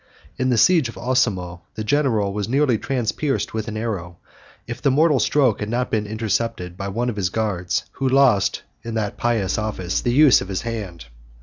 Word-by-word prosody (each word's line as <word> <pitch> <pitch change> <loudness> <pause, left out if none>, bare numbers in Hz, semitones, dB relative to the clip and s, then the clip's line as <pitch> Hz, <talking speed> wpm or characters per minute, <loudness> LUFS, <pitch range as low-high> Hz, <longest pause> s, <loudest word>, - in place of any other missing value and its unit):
In 130 - 0
the 125 - +2
siege 160 -1 +4
of - - -10
Osimo, 100 -9 0
the 110 - -4
general 110 -6 +1
was 105 +1 -3
nearly 130 -3 +2
transpierced 135 +2 -1
with 110 0 -3
an 110 -1 -4
arrow, 95 -6 -4 0.5
if - - -7
the - - +3
mortal 150 +1 +3
stroke 125 0 +2
had 105 - -4
not 125 +2 -1
been 105 -1 0
intercepted 110 -3 -2
by 100 +2 -5
one 115 +5 -2
of 105 - -9
his 95 -3 0
guards, 95 -4 -1
who 135 -1 -1
lost, 130 -7 +3 0.2
in 115 -1 -6
that 105 -2 -2
pious 110 -5 0
office, 100 -4 -2
the 120 - 0
use 140 +1 +6
of - - -6
his 95 -1 -3
hand. 105 - -5
110 Hz, 195 wpm, -22 LUFS, 100-125 Hz, 0.5 s, use